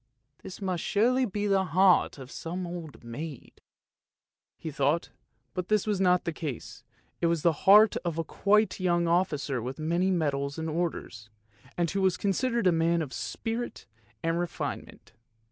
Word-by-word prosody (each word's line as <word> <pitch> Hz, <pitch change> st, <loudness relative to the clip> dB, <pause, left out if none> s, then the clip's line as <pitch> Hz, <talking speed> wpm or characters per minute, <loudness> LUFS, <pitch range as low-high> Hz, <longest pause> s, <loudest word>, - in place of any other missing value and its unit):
;< 140 Hz, +4 st, -49 dB
This 190 Hz, +2 st, -9 dB
must 185 Hz, -3 st, -1 dB
surely 250 Hz, +5 st, +2 dB
be 205 Hz, +1 st, -3 dB
the 195 Hz, -2 st, +3 dB
heart 180 Hz, 0 st, +4 dB
of 135 Hz, 0 st, -10 dB
some 180 Hz, +2 st, -5 dB
old 170 Hz, -6 st, -8 dB
maid! 130 Hz, +4 st, -8 dB, 0.5 s
" 65 Hz, +2 st, -65 dB
he 160 Hz, -, -6 dB
thought, 145 Hz, +3 st, 0 dB, 0.4 s
but 180 Hz, -1 st, -3 dB
this 215 Hz, -2 st, +2 dB
was 205 Hz, -3 st, 0 dB
not 180 Hz, -1 st, +4 dB
the 170 Hz, -, -3 dB
case, 140 Hz, -6 st, -6 dB, 0.4 s
it 170 Hz, -, +3 dB
was 165 Hz, -2 st, 0 dB
the 170 Hz, +2 st, +1 dB
heart 210 Hz, +2 st, +8 dB
of 170 Hz, -3 st, -3 dB
quite 210 Hz, +5 st, +2 dB
a -, -, -5 dB
young 175 Hz, -1 st, +2 dB
officer 150 Hz, -7 st, 0 dB
with 125 Hz, +3 st, -5 dB
many 170 Hz, +4 st, 0 dB
medals 140 Hz, -5 st, -1 dB
and 160 Hz, 0 st, -3 dB
orders, 155 Hz, -10 st, -3 dB, 0.5 s
and 170 Hz, -2 st, +1 dB
who 195 Hz, -, -1 dB
was 190 Hz, -1 st, +2 dB
considered 235 Hz, +3 st, 0 dB
a 180 Hz, -, +6 dB
man 165 Hz, 0 st, +2 dB
of 135 Hz, -, -8 dB
spirit 230 Hz, +1 st, -4 dB, 0.4 s
and 165 Hz, +1 st, 0 dB
refinement. 175 Hz, -1 st, -5 dB
170 Hz, 170 wpm, -28 LUFS, 155-190 Hz, 0.5 s, heart